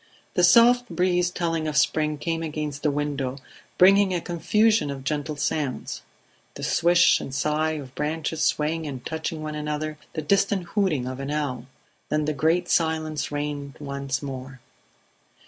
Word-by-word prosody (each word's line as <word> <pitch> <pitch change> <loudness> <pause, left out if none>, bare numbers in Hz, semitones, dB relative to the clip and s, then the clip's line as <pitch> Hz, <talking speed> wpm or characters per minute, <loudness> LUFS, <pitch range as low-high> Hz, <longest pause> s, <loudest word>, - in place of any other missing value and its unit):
The 180 - +2
soft 240 +6 +6
breeze 180 0 +1
telling 165 -3 -2
of 150 -1 -1
spring 150 0 +2
came 165 +2 -2
against 150 -3 -4
the 150 - +2
window, 140 -2 -2 0.4
bringing 195 0 +6
a - - +1
confusion 210 +3 +2
of 135 -1 -5
gentle 150 +2 -2
sounds; 145 -2 -2 0.5
the - - -7
swish 170 0 +4
and - - -6
sigh 150 +3 0
of 140 -4 -7
branches 155 +1 -2
swaying 155 +1 0
and 130 -4 -7
touching 160 0 -4
one 155 0 -4
another, 150 0 -3
the 155 - -3
distant 195 +3 +2
hooting 185 - +1
of 130 +1 -5
an 135 0 -4
owl. 140 -5 -2 0.4
Then 150 0 +1
the 155 - 0
great 165 +4 +1
silence 155 -4 0
reigned 145 -2 -4
once 140 -1 -3
more. 135 -1 -7
155 Hz, 155 wpm, -25 LUFS, 145-170 Hz, 0.5 s, soft